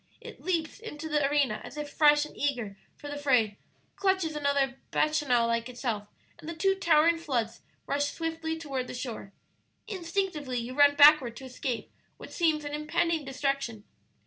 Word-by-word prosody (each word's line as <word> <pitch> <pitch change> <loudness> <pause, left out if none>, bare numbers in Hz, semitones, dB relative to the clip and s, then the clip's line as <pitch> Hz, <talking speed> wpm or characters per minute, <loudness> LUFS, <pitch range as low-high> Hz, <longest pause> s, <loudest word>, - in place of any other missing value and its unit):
It - - -11
leaps 335 -2 -2
into 320 -9 -7
the 295 -2 +1
arena 280 -7 +1
as - - -10
if 295 0 -4
fresh 295 -1 +5
and - - -13
eager 245 -8 -2 0.2
for 290 - -10
the 290 0 -5
fray, 240 -8 +2 0.4
clutches 380 -5 0
another 280 -2 0
Bacchanal 290 -6 +2
like 230 +1 -1
itself, 235 -4 -3 0.3
and 310 - -8
the 335 - -5
two 385 +4 +2
towering 335 -3 +3
floods 235 -8 -2 0.2
rush 285 +1 0
swiftly 320 +1 -3
toward 270 -5 -4
the - - -7
shore. 235 -6 -6 0.6
Instinctively 340 - -2
you 240 +1 -4
run 285 +1 +5
backward 285 -5 +6
to 265 - -9
escape 255 -1 -4 0.3
what - - -11
seems 315 -3 +1
an 290 - -5
impending 325 +1 0
destruction. 270 -5 -2
290 Hz, 165 wpm, -29 LUFS, 255-320 Hz, 0.6 s, backward